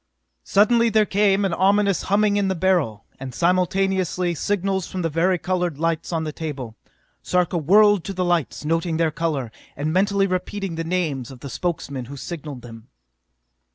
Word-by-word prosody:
Suddenly 230 +3 +3
there 215 -1 +3
came 200 0 +2
an 190 - 0
ominous 200 +1 +2
humming 205 +1 +3
in 200 -1 +1
the 190 - 0
Beryl, 165 - 0
and 130 -2 -7
simultaneously 185 0 +1
signals 190 +1 -1
from 185 -1 -4
the 165 - -1
vari 180 +4 +2
colored 180 -3 -2
lights 165 +1 -1
on 165 -2 -1
the 155 -1 -4
table. 140 -9 -6 0.5
Sarka 180 -1 0
whirled 205 +4 +5
to 195 - -4
the 185 -1 -1
lights, 175 -4 -1
noting 165 +1 0
their 165 -1 +1
color, 150 -8 -2 0.3
and 150 +2 -1
mentally 200 +1 +2
repeating 190 0 -3
the 165 0 -3
names 160 -7 -2
of 130 -2 -12
the 140 - -7
Spokesmen 140 -7 -3
who 140 +3 -9
signalled 145 -5 -7
him. 115 -1 -12
175 Hz, 170 wpm, -22 LUFS, 155-195 Hz, 0.5 s, whirled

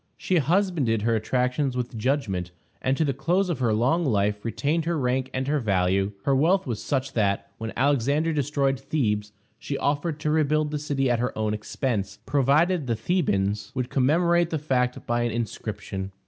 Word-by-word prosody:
She 185 - 0
husbanded 160 - +1
her 115 0 +2
attractions 125 +4 0
with 125 -1 -3
judgment, 110 -7 -1 0.3
and 130 +1 +1
to 160 - +2
the 140 - 0
close 175 +8 +1
of 160 - -3
her 120 -3 +2
long 125 +11 +2
life 105 -6 +1
retained 150 +8 -1
her 170 -1 0
rank 130 -1 0
and 130 +1 -2
her 150 +1 +1
value. 95 -2 +1
Her 140 - +2
wealth 175 +8 +3
was 115 -5 -3
such 135 -1 -2
that, 100 -3 0
when 110 0 -4
Alexander 145 +4 +2
destroyed 140 -2 0
Thebes, 105 -7 -1 0.3
she 140 - -4
offered 145 +2 -1
to 150 - 0
rebuild 155 -1 +2
the 150 - -2
city 140 -2 0
at 120 -2 +2
her 125 -1 -2
own 110 -1 0
expense, 105 -1 -3
provided 150 +3 +2
the 115 - +1
Thebans 105 - 0
would 125 -1 -2
commemorate 170 +5 +3
the 160 - -1
fact 125 -4 -1
by 120 0 0
an 120 - +1
inscription. 100 -3 -4
130 Hz, 180 wpm, -25 LUFS, 110-150 Hz, 0.3 s, wealth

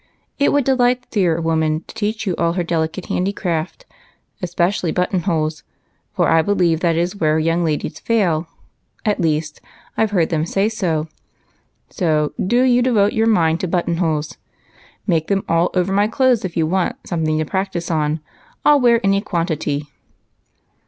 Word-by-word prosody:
It 285 - +3
would 285 -1 +2
delight 250 -1 +2
the - - -31
dear 175 -6 +1
woman 160 -1 0
to - - -12
teach 220 0 -2
you 185 -4 -1
all 170 0 +1
her 180 0 -1
delicate 165 +1 -2
handicraft, 180 - -2 0.6
especially 175 0 0
button 180 +2 0
holes, 160 -4 -1 0.5
for - - +1
I 165 0 +4
believe 175 -3 +1
that 170 -1 +1
is 175 +4 -1
where 155 -3 +2
young 165 +2 +1
ladies 155 -1 -2
fail; 180 -8 +1 0.6
at 210 -3 +1
least 155 -1 -1 0.3
I - - +2
've 220 - +1
heard 180 -6 +1
them 155 -2 0
say 195 +4 +1
so. 165 -8 -1 0.8
So, 155 -4 0
do 240 +6 +2
you 250 -1 +4
devote 220 -5 +2
your 225 0 +2
mind 165 -7 +3
to 185 - -2
button 170 -1 -1
holes; 155 -3 -1 0.7
make 165 -5 0
'em 195 -1 +1
all 165 +1 +2
over 185 +1 +1
my 205 +1 +3
clothes 250 0 +2
if 180 -3 -4
you 160 - +2
want 180 +2 0
something 160 -3 -1
to 155 - 0
practice 190 -1 -3
on. 155 -1 0 0.4
I - - +7
'11 290 -2 +4
wear 235 -2 +4
any 195 0 +3
quantity." 160 -6 -2
175 Hz, 170 wpm, -19 LUFS, 160-205 Hz, 0.8 s, I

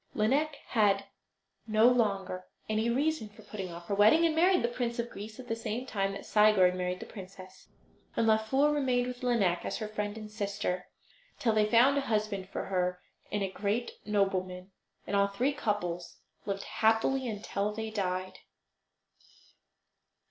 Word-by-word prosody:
Lineik 280 +8 +2
had 200 -3 +3 0.6
no 220 +1 +5
longer 195 -6 +1 0.2
any 220 +2 0
reason 270 -2 0
for 210 - -16
putting 190 -4 -6
off 170 0 -9
her 200 - -3
wedding, 215 +12 +6
and 320 -1 +2
married 360 +3 +4
the - - +3
Prince 240 -1 -3
of 235 0 -3
Greece 215 +4 -9
at 255 - -9
the 225 - -1
same 230 +2 -4
time 195 -5 -1
that 200 - -8
Sigurd 210 -4 +5
married 180 0 -2
the - - -7
princess. 185 -1 -11 0.5
And 230 - +2
Laufer 225 +7 +3
remained 255 -4 +1
with 250 0 -6
Lineik 215 -9 +1
as - - -3
her 215 - -4
friend 210 0 -4
and 215 -1 -8
sister, 200 -3 -3 0.5
till 225 -3 +1
they 215 -1 +3
found 255 +5 +5
a - - -1
husband 210 -6 -1
for - - -4
her 180 -1 -1 0.3
in 205 -1 -1
a 190 - -2
great 205 +5 -1
nobleman; 190 -2 -1 0.3
and 200 - -2
all 200 0 +4
three 245 +8 0
couples 205 -10 -3 0.3
lived 195 0 -2
happily 225 +4 +1
until 210 -1 -2
they 220 +1 -5
died. 185 -2 -2
215 Hz, 165 wpm, -30 LUFS, 195-235 Hz, 0.6 s, wedding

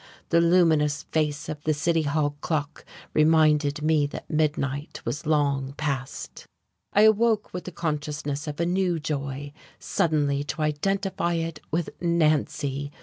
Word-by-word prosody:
The 170 0 +4
luminous 160 -4 +3
face 150 -2 -1
of 150 -1 -5
the 155 -1 +1
city 165 +2 +1
hall 145 -1 0
clock 150 -2 -3 0.3
reminded 155 -1 +3
me 155 -2 +3
that - - -8
midnight 150 -2 -1
was 150 +2 -3
long 140 -3 +1
past.... 140 -3 -4 0.4
I 205 - +5
awoke 220 0 +3
with 180 - -5
the 185 - -6
consciousness 150 -2 -3
of 150 +1 -5
a 170 - +2
new 180 -1 +1
joy, 140 -1 -4 0.2
suddenly 145 -3 0
to 155 - -3
identify 180 +4 0
it 165 -2 -3
with 165 +1 -1
Nancy. 150 -4 +1
155 Hz, 140 wpm, -26 LUFS, 145-165 Hz, 0.4 s, I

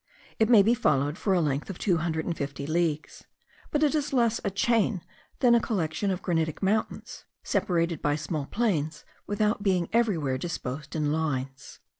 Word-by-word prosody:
It 220 0 +3
may 220 -5 +7
be 225 +4 +4
followed 145 - +1
for 195 - -1
a 175 - +3
length 145 +1 -1
of 190 - -5
two 180 -5 +1
hundred 160 -1 -2
and 170 - -2
fifty 140 -1 -4
leagues; 155 -1 -1 0.4
but 300 0 +1
it 300 - +3
is 295 -2 -1
less 235 -4 +2
a 200 - 0
chain, 215 -2 +1 0.4
than 245 -2 +6
a 235 - +6
collection 190 -2 -1
of 185 -1 -2
granitic 165 -1 -1
mountains, 215 +3 -2 0.2
separated 170 -3 0
by 145 0 +1
small 150 -1 -3
plains, 160 -10 -1 0.2
without 210 +1 0
being 185 -4 +1
everywhere 165 - +1
disposed 150 -3 -5
in 150 -2 0
lines. 135 -4 -3
170 Hz, 175 wpm, -27 LUFS, 150-215 Hz, 0.4 s, may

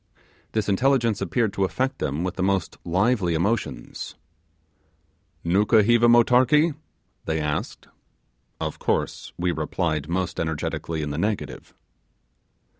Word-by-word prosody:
This 110 -2 0
intelligence 115 0 +2
appeared 100 +3 0
to 100 - 0
affect 130 +7 -1
them 75 +4 -2
with 90 -1 -2
the - - -5
most 95 -2 0
lively 95 0 +1
emotions. 105 +7 -2 1.3
'Nukuheva 110 +6 +4
motarkee?' 130 +7 +5 0.5
they 80 0 -1
asked. 75 -1 -3 0.7
Of - - -4
course - - -1
we 90 0 0
replied 80 -1 -2
most 90 0 -2
energetically 80 0 -2
in 75 - -3
the 75 - -3
negative. 85 - -3
95 Hz, 115 wpm, -24 LUFS, 80-115 Hz, 1.3 s, motarkee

